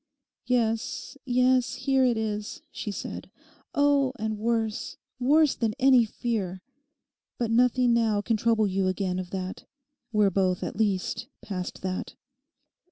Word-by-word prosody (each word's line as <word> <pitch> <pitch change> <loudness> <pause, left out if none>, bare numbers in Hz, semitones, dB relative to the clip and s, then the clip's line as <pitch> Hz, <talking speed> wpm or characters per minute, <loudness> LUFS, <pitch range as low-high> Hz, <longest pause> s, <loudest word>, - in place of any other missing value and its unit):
'Yes, 245 +3 -1
yes, 250 -1 +2
here 265 +1 +2
it 245 -3 +3
is,' 215 +2 -3
she 215 - -5
said, 200 - -6 0.5
'oh, 285 -2 +3
and 220 -2 -3
worse, 225 -1 -1 0.2
worse 295 +3 +4
than 225 -2 -1
any 260 -3 +5
fear. 200 -5 -3 0.7
But 235 -2 -1
nothing 245 +1 +4
now 225 -3 +2
can 225 +2 0
trouble 220 0 +2
you 190 -1 0
again 185 -1 -1
of 180 -1 -5
that. 185 0 -5 0.5
We're 210 -3 +3
both 185 -1 +1
at - - -4
least 200 -3 -1 0.2
past 185 -3 -5
that. 185 0 -4
225 Hz, 135 wpm, -27 LUFS, 200-250 Hz, 0.7 s, any